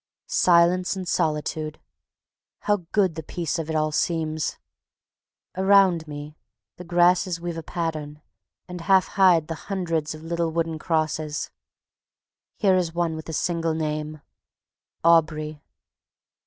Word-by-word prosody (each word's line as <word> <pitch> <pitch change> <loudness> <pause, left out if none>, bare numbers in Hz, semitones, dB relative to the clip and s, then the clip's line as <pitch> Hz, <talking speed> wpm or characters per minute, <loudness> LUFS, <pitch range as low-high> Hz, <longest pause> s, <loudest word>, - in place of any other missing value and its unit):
Silence 180 +1 +3
and 185 -2 -5
solitude! 155 -1 -1 0.8
How 205 -5 0
good 195 -5 +2
the 160 - -5
peace 165 +1 -3
of 160 -1 -4
it 160 - -2
all 155 0 +1
seems! 160 -1 -1 1.0
Around 190 -4 +4
me 150 0 -8 0.4
the 180 - -8
grasses 175 0 +2
weave 170 0 -4
a 165 - -4
pattern, 155 -3 -4 0.5
and 180 -1 -7
half 190 +2 +3
hide 180 -5 +4
the 165 - -3 0.2
hundreds 165 -6 -1
of 155 - -12
little 170 0 -1
wooden 165 -1 -2
crosses. 155 -2 -1 1.1
Here 195 -3 +3
is 170 -2 -1
one 170 -2 0
with 160 +1 -8
a - - -4
single 165 0 -1
name: 155 -1 -3 0.8
AUBREY. 155 -2 +2
165 Hz, 130 wpm, -24 LUFS, 155-175 Hz, 1.1 s, Around